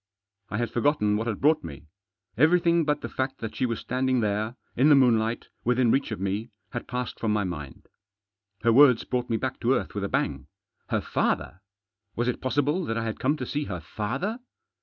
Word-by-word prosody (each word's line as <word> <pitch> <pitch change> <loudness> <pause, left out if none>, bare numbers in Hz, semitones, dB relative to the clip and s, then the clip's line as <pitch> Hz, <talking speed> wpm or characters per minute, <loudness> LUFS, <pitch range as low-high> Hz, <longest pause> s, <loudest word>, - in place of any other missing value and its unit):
I 110 - -3
had 120 -1 -1
forgotten 120 -4 +2
what 110 +2 -2
had 110 -3 -2
brought 155 +3 +3
me. 75 -3 -9 0.5
Everything 170 +4 +4
but 150 0 0
the - - -4
fact 130 0 -3
that 110 -1 -6
she 130 - 0
was 115 -2 -2
standing 130 0 0
there, 105 +2 -1 0.2
in 135 +5 +4
the 145 - +8
moon 125 -4 +5
light, 115 +2 -3
within 125 -1 +3
reach 140 - +1
of 110 - -4
me, 100 +4 -2 0.2
had 120 - -5
passed 125 -1 -4
from 110 - 0
my 105 -1 +1
mind. 75 -7 -6 0.8
Her 115 0 +4
words 130 -2 +6
brought 125 -1 -2
me 115 - +1
back - - -3
to - - +2
earth - - -3
with - - -3
a - - -2
bang. 70 -1 -1 0.4
Her - - +1
father? 90 - -1 0.5
Was 120 +1 0
it 125 - -1
possible 145 +7 +1
that 115 - -2
I 115 - -1
had 110 -1 -4
come 145 +4 +1
to - - -4
see 150 0 -2
her 90 -7 -4
father? 125 - -3
120 Hz, 210 wpm, -26 LUFS, 110-135 Hz, 0.8 s, the